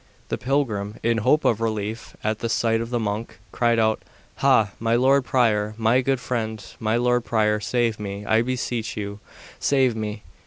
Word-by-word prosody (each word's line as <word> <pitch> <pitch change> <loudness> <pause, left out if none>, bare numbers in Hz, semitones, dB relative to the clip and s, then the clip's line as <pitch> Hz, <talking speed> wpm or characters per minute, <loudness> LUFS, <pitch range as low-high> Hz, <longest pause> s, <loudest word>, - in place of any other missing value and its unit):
The - - -1
pilgrim, 115 -7 -1
in 115 0 +2
hope 150 +8 +2
of 115 -1 +2
relief 110 0 -3
at 110 0 -1
the 115 - -2
sight 115 0 +1
of 115 - -4
the 120 -1 -1
monk, 105 -1 -3
cried 120 -1 +2
out, 110 -1 +2 0.4
Ha, 130 -7 +4
my 115 +1 +1
lord 135 +2 +4
prior, 110 -3 +1
my 115 +3 +3
good 135 0 0
friend, 110 -4 -3
my 110 0 +1
lord 125 0 +2
prior, 105 -2 +1
save 115 0 0
me, 100 0 -5
I 110 +1 +3
beseech 120 -3 -3
you, 100 0 -5 0.4
save 130 -4 +2
me! 105 -1 -4
115 Hz, 180 wpm, -23 LUFS, 110-120 Hz, 0.4 s, Ha